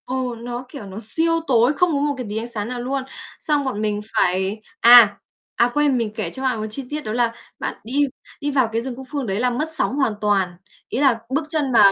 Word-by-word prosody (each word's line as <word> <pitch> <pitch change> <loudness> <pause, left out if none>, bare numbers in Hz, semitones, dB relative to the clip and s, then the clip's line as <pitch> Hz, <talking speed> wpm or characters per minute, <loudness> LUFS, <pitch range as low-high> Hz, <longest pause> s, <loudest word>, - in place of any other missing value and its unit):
Ồ, 255 -1 -2
nó, 240 +2 -6
kiểu, 275 -9 -8
nó 190 0 -9
siêu 330 +9 +1
tối, 245 +1 +4
không 345 +3 +2
có 285 - +1
một 290 0 +1
cái 250 - -4
tí 210 - -3
ánh 225 +2 -3
sáng 210 -3 -3
nào 245 0 -4
luôn. 265 +2 -2 0.4
Xong 295 -2 +1
bọn 255 -6 -2
mình 210 -1 -1
phải 190 +2 +1 0.2
à! 235 -4 +8 0.4
À, 240 - +3
quên 290 -3 +2
mình 230 -3 -1
kể 215 - -3
cho 265 - -7
bạn 255 -4 0
một 215 - -3
chi 270 +6 -5
tiết 300 +1 -3
đó 215 - -5
là 235 -1 +1 0.3
bạn - - -2
đi 230 +4 -8 0.5
đi 290 0 -1
vào 260 -5 +2
cái 225 +1 0
rừng 255 0 -5
Cúc 265 +1 -9
Phương 280 -5 -2
đấy 195 +1 -1
là 250 +1 +2
mất 295 +6 -2
sóng 275 - 0
hoàn 270 -6 +2
toàn, 195 -4 +1 0.3
ý - - -2
là 265 -5 +4
bước 285 +5 0
chân 295 -4 0
vào 205 -4 +7
245 Hz, 250 wpm, -21 LUFS, 215-275 Hz, 0.5 s, à